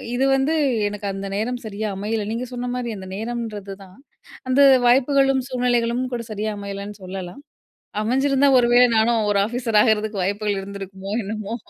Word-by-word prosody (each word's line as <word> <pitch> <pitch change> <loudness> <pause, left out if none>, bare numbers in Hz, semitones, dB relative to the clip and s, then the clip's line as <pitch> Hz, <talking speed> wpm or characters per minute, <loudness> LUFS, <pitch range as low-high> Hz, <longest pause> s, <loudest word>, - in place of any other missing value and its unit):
இது 265 +2 +2
வந்து 270 +4 +1 0.4
எனக்கு 205 0 -6
அந்த 195 0 -5
நேரம் 245 +3 -2
சரியா 215 +1 -4
அமையல. 215 +1 -2
நீங்க 245 +2 -3
சொன்ன 245 0 -4
மாரி 245 -2 -3
அந்த 190 0 -9
நேரம்ன்றது 220 -3 -5
தான். 185 0 -17 0.5
அந்த 270 +2 +4 0.3
வாய்ப்புகளும் 270 +1 +3
சூழ்நிலைகளும் 245 -1 0
கூட 235 - -2
சரியா 215 +1 -2
அமையலைன்னு 200 0 -6
சொல்லலாம். 185 +6 -7 0.6
அமைஞ்சிருந்தா, 270 +4 +2
ஒரு 240 - +3
வேளை 245 +1 +7
நானும் 220 -1 +2
ஒரு 200 - +2
ஆபிசர் 230 -2 0
ஆகுறதுக்கு 215 -3 +1
வாய்ப்புகள் 205 +1 -1
இருந்திருக்குமோ, 195 0 -8
என்னமோ. 215 +2 -5
220 Hz, 155 wpm, -22 LUFS, 200-245 Hz, 0.6 s, வேளை